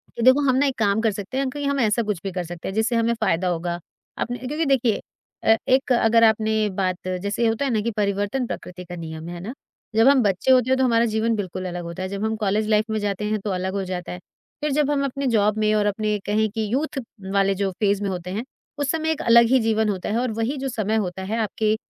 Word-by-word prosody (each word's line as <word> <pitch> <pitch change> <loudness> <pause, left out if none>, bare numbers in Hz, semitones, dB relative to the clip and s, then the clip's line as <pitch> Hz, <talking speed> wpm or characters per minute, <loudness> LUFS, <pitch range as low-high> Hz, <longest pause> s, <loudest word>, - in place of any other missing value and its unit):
कि - - -4
देखो, 260 +3 +6
हम 255 - +3
ना, 275 +2 +3
एक 270 -2 -1
काम 205 0 +2
कर 225 -1 +2
सकते 205 +5 -5
हैं, 270 -1 0
कहीं 285 +2 -4
हम 280 0 0
ऐसा 225 -1 +2
कुछ 210 -4 -2
भी 195 - -3
कर 180 0 -3
सकते 175 0 -7
हैं, 190 - -3
जिससे 220 +2 +1
हमें 230 0 +2
फ़ायदा 190 -6 0
होगा। 175 0 -2 0.4
आपने 245 +1 -2
क्योंकि 305 +4 -1
देखिए 255 -6 +2 0.4
अ, 220 - +6
एक 260 +1 +3
अगर 230 -1 +4
आपने 220 -1 +3
बात, 185 -2 +1 0.3
जैसे 205 +3 0
होता 225 +5 0
है 270 - 0
ना 220 -2 +1
कि 235 +2 -1
परिवर्तन 205 +5 0
प्रकृति 180 -4 -7
का 175 0 -8
नियम 160 -1 -7
है, - - -6
है - - -7
ना? 215 +7 -6 0.4
जब 225 +3 +5
हम 275 -1 +6
बच्चे 200 +5 +2
होते 255 -1 +4
हैं, 260 - +3
तो 265 - +2
हमारा 235 -2 +3
जीवन 225 +1 0
बिल्कुल 185 -2 -4
अलग 175 -1 -5
होता 170 +2 -6
है, 185 - -3
जब 200 +1 -4
हम 220 0 0
कॉलेज 210 0 0
लाइफ़ 215 +1 +2
में 220 - 0
जाते 205 0 -2
हैं, 215 0 0
तो 205 - -4
अलग 185 0 -2
हो 200 -1 -1
जाता 180 -1 -5
है। 180 - -6 0.4
फिर 300 0 0
जब 290 0 +2
हम 280 -1 +1
अपने 275 0 -2
जॉब 210 0 +2
में 215 0 +2
और 210 -1 +2
अपने 210 +1 0
कहें 215 +1 +1
कि 220 0 -2
यूथ 290 +1 -1 0.3
वाले 195 0 +3
जो 195 0 0
फ़ेज़ 205 -1 +2
में 200 - -1
होते 180 -1 -5
हैं, 210 +5 -3 0.3
उस 285 -2 0
समय 320 0 0
एक 315 - -2
अलग 235 0 +6
ही 260 +1 +5
जीवन 220 -1 +1
होता 190 -3 -3
है 215 - 0
और 250 -1 -1
वही 245 +6 -1
जो 270 0 -3
समय 220 -3 -1
होता 180 +1 -6
है, 210 +4 -2
आपके 215 0 0
215 Hz, 265 wpm, -23 LUFS, 195-245 Hz, 0.4 s, देखो